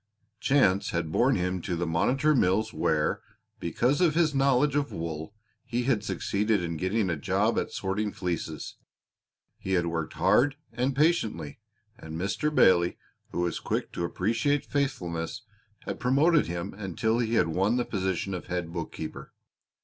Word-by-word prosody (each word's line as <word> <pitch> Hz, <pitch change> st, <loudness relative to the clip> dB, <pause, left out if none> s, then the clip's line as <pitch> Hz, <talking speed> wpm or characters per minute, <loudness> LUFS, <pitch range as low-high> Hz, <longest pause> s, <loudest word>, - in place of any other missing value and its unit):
Chance 115 Hz, -9 st, +3 dB
had 85 Hz, -2 st, -2 dB
borne 125 Hz, +9 st, +3 dB
him 90 Hz, 0 st, -1 dB
to 90 Hz, 0 st, -2 dB
the 85 Hz, +1 st, -1 dB
Monitor 130 Hz, -, +2 dB
Mills 110 Hz, -2 st, +2 dB
where, 75 Hz, -1 st, +1 dB, 0.4 s
because 125 Hz, -, +1 dB
of 165 Hz, -4 st, +3 dB
his 165 Hz, -3 st, +3 dB
knowledge 135 Hz, +1 st, +3 dB
of 145 Hz, -1 st, 0 dB
wool, 80 Hz, +3 st, -5 dB, 0.3 s
he 120 Hz, +1 st, -2 dB
had 120 Hz, -5 st, +1 dB
succeeded 105 Hz, -1 st, 0 dB
in 85 Hz, -1 st, -3 dB
getting 95 Hz, +5 st, 0 dB
a -, -, 0 dB
job 70 Hz, -, +1 dB
at -, -, -3 dB
sorting 105 Hz, +2 st, -2 dB
fleeces. 90 Hz, -5 st, -4 dB, 0.8 s
He 95 Hz, -, -3 dB
had 85 Hz, -2 st, +2 dB
worked 85 Hz, -2 st, -3 dB
hard 140 Hz, +2 st, +3 dB, 0.2 s
and 125 Hz, +3 st, 0 dB
patiently, 135 Hz, -, +1 dB, 0.4 s
and 80 Hz, 0 st, -8 dB
Mr. 100 Hz, -, -1 dB
Bailey, 90 Hz, -10 st, +4 dB, 0.3 s
who 85 Hz, -, -2 dB
was 85 Hz, -1 st, -1 dB
quick -, -, -2 dB
to -, -, -3 dB
appreciate 115 Hz, -, 0 dB
faithfulness, 100 Hz, -, -2 dB, 0.4 s
had -, -, -5 dB
promoted 150 Hz, +6 st, +3 dB
him 85 Hz, +3 st, -4 dB
until 105 Hz, +4 st, -1 dB
he 115 Hz, -1 st, 0 dB
had 85 Hz, -, +3 dB
won 95 Hz, +8 st, +1 dB
the 120 Hz, -, 0 dB
position 95 Hz, -1 st, -2 dB
of 90 Hz, -, -5 dB
head 90 Hz, -2 st, -3 dB
bookkeeper. 85 Hz, -2 st, -6 dB
100 Hz, 155 wpm, -28 LUFS, 85-130 Hz, 0.8 s, Bailey